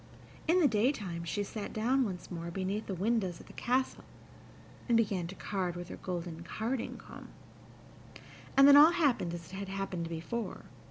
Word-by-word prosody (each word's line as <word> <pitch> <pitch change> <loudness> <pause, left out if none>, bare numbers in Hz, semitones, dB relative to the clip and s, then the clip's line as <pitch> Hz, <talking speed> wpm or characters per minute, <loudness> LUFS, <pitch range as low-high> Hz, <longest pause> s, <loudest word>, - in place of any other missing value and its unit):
In 345 +3 +5
the 305 - +6
daytime 210 -7 0
she 205 +5 -1
sat 205 +1 -6
down 250 +5 +2
once 185 -4 -6
more 170 -1 -4
beneath 195 +4 -3
the 195 - -3
windows 190 -2 0
of - - -13
the - - -14
castle, 255 +2 0 0.9
and 235 - +5
began 195 -6 +1
to 190 - -8
card 185 -4 -2
with 175 0 -7
her - - -7
golden 175 -2 -5
carding 225 +8 -3
comb; - - -11 1.3
and 275 0 +9
then 285 - +9
all 305 +4 +9
happened 275 - +2
as 170 +1 -10
it - - -5
had 195 -1 -5
happened 190 -4 -3
before. 170 +8 -4
195 Hz, 175 wpm, -32 LUFS, 175-235 Hz, 1.3 s, and